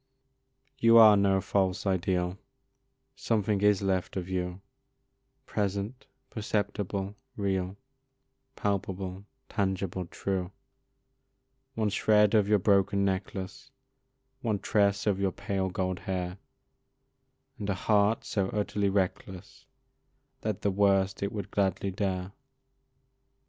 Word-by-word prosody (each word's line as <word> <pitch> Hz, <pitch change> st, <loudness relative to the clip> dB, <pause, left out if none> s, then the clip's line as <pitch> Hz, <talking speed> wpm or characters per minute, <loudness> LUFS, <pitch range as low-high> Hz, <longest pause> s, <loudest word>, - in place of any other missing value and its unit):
You 115 Hz, -1 st, +6 dB
are 110 Hz, -2 st, +9 dB
no 100 Hz, -1 st, +3 dB
false 95 Hz, 0 st, 0 dB
ideal, 90 Hz, -1 st, 0 dB, 0.8 s
Something 105 Hz, -2 st, 0 dB
is 105 Hz, -1 st, +3 dB
left 95 Hz, -1 st, -1 dB
of 90 Hz, -1 st, -3 dB
you, 90 Hz, 0 st, -3 dB, 0.8 s
Present, 100 Hz, +5 st, -3 dB, 0.2 s
perceptible, 100 Hz, -2 st, -2 dB, 0.2 s
real, 95 Hz, -1 st, -1 dB, 0.8 s
Palpable, 95 Hz, -1 st, -3 dB, 0.2 s
tangible, 95 Hz, -3 st, -2 dB
true; 95 Hz, 0 st, -3 dB, 1.2 s
One 110 Hz, -2 st, +1 dB
shred 105 Hz, +1 st, +3 dB
of 105 Hz, -3 st, +4 dB
your 105 Hz, 0 st, +4 dB
broken 100 Hz, 0 st, +2 dB
necklace, 95 Hz, +5 st, -4 dB, 0.7 s
One 110 Hz, -5 st, 0 dB
tress 100 Hz, 0 st, +1 dB
of 100 Hz, -3 st, +1 dB
your 100 Hz, -1 st, +1 dB
pale, 95 Hz, +1 st, -2 dB
gold 95 Hz, -1 st, -2 dB
hair, 90 Hz, 0 st, -4 dB, 1.2 s
And 105 Hz, -1 st, -4 dB
a 100 Hz, -, +1 dB
heart 105 Hz, +3 st, +2 dB
so 100 Hz, -3 st, -1 dB
utterly 105 Hz, -1 st, 0 dB
reckless, 95 Hz, -1 st, -3 dB, 0.7 s
That 110 Hz, -7 st, -3 dB
the 100 Hz, -, +2 dB
worst 95 Hz, -1 st, +2 dB
it 100 Hz, +1 st, -1 dB
would 105 Hz, -2 st, -5 dB
gladly 100 Hz, -1 st, 0 dB
dare. 95 Hz, -1 st, -2 dB
100 Hz, 105 wpm, -29 LUFS, 95-105 Hz, 1.2 s, are